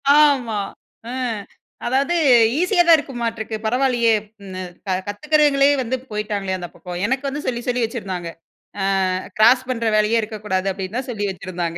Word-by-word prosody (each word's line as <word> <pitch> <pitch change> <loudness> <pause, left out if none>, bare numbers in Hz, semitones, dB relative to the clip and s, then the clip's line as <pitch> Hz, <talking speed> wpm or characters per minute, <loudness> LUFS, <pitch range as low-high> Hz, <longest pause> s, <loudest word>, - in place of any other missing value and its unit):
ஆமா. 265 -8 +3 0.5
அ - - -5 0.7
அதாவது, 270 +7 +1 0.5
"ஈஸியாதான் 350 -3 +5
இருக்குமாட்டிருக்கு. 230 -5 -4
பரவாயில்லியே! 240 -1 +2 0.3
ம் 190 - -9
ந 185 - -5 0.5
கத்துக்கிறவங்களே 285 +5 +3
வந்து 255 +2 -2
போய்ட்டாங்களே, 205 -3 -2
அந்த 175 -2 -7
பக்கம்," 180 0 -7
எனக்கு 265 +2 -1
வந்து 295 +2 -5
சொல்லி, 240 -1 -1
சொல்லி 245 -1 +1
வச்சிருந்தாங்க. 190 -7 -5 0.5
அ - - +1 0.5
"கிராஸ் 250 +3 +5
பண்ற 230 -2 -1
வேலையே 215 +2 +3
இருக்கக்கூடாது" 210 -3 -2
அப்பிடீன்னு 195 +5 -4
தான் 265 -1 -6
சொல்லி 205 -3 -2
வச்சிருந்தாங்க. 175 -2 -4
230 Hz, 140 wpm, -21 LUFS, 200-265 Hz, 0.7 s, ஈஸியாதான்